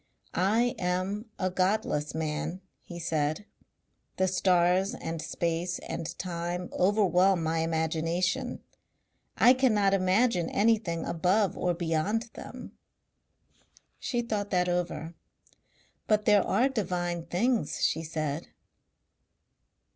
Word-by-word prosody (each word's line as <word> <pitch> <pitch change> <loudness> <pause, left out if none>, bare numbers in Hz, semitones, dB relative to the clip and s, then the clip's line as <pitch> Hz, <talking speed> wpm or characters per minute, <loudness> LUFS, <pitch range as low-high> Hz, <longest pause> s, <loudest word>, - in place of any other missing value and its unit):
"I 225 +7 +2
am 185 +4 -1
a 185 -1 -1
godless 185 -6 0
man," 160 +3 -3 0.2
he 175 - -9
said. 160 +2 -1 0.7
"The 190 - +2
stars 185 +3 +2
and 165 -7 -5
space 170 +2 -2
and 165 -2 -6
time 175 0 -4
overwhelm 190 -2 +3
my 160 +1 0
imagination. 165 +8 -1 0.7
I 245 - +7
cannot 215 -7 +3
imagine 185 0 +2
anything 205 -6 +1
above 180 +4 +1
or 175 -1 0
beyond 175 +8 -1
them." - - -9 1.3
She 240 -2 -1
thought 205 -3 -2
that 180 -1 +1
over. 170 -2 -2 0.9
"But 210 -1 +2
there 210 -1 +6
are 255 - +3
divine 175 -8 -2
things," 225 - 0
she 160 - +1
said. 155 -1 -3
180 Hz, 105 wpm, -29 LUFS, 165-205 Hz, 1.3 s, I